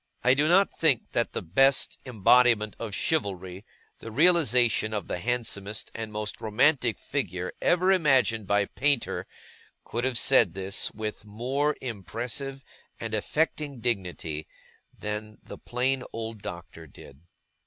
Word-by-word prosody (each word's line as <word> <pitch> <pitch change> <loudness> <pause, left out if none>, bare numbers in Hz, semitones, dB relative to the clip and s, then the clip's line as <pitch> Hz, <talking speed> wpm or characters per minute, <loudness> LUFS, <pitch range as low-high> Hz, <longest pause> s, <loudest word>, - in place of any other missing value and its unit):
I 125 - +5
do 145 +3 +2
not 195 +3 +5
think 150 -8 +1
that 120 - -1
the - - -3
best 135 +11 +3
embodiment 115 -1 +4
of 110 -3 -4
chivalry, 95 - -2 0.4
the 115 - -8
realization 125 -7 +3
of 105 - -3
the - - -3
handsomest 110 -2 -3
and 110 -1 -5
most 105 0 -4
romantic 120 +2 +2
figure 90 -10 -3
ever 185 +2 +3
imagined 130 - +3
by 100 0 +2
painter, 140 +3 -1 0.6
could 120 +2 -4
have 130 -2 +1
said 115 -10 +4
this, 95 0 -2
with 110 0 -5
a - - -19
more 130 +8 -1
impressive 125 +4 -4 0.4
and 115 -1 -5
affecting 145 +4 -1
dignity 90 -9 -3 0.5
than 105 0 -5
the - - -10
plain 130 +2 -1
old 115 -2 -6
Doctor 85 -3 -8
did. 70 +1 -15
115 Hz, 135 wpm, -27 LUFS, 105-135 Hz, 0.6 s, I